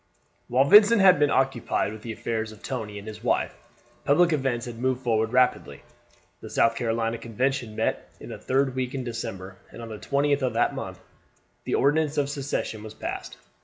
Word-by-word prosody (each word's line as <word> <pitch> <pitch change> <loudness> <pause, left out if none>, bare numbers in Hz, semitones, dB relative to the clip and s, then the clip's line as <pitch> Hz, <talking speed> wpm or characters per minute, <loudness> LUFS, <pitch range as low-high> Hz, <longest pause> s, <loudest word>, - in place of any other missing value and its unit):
While 130 +3 +3
Vincent 210 +7 +7
had 190 -5 +6
been 145 -1 +4
occupied 130 -6 0
with 110 - -10
the 115 - -6
affairs 110 0 -3
of 110 - -15
Tony 105 -2 -5
and 100 +1 -9
his 110 -1 -9
wife, - - 0 0.5
public 170 +4 +4
events 130 -5 -1
had 120 -2 -8
moved 130 0 0
forward 110 -2 +1
rapidly. 125 - +1 0.6
The - - -9
South 115 - +3
Carolina 115 0 -1
Convention 120 -1 -2
met - - -2
in - - -10
the - - -7
third 135 0 0
week 130 0 -3
in 130 - -3
December, 95 -5 -6
and - - -12
on 115 -1 -8
the 110 -1 -7
20th 140 0 +1
of 130 -3 0
that 115 - +1
month - - -6 0.7
the - - 0
Ordinance 150 +1 +2
of 140 -1 +1
Secession 140 -6 -3
was 110 0 -10
passed. - - -6
125 Hz, 190 wpm, -25 LUFS, 110-140 Hz, 0.7 s, Vincent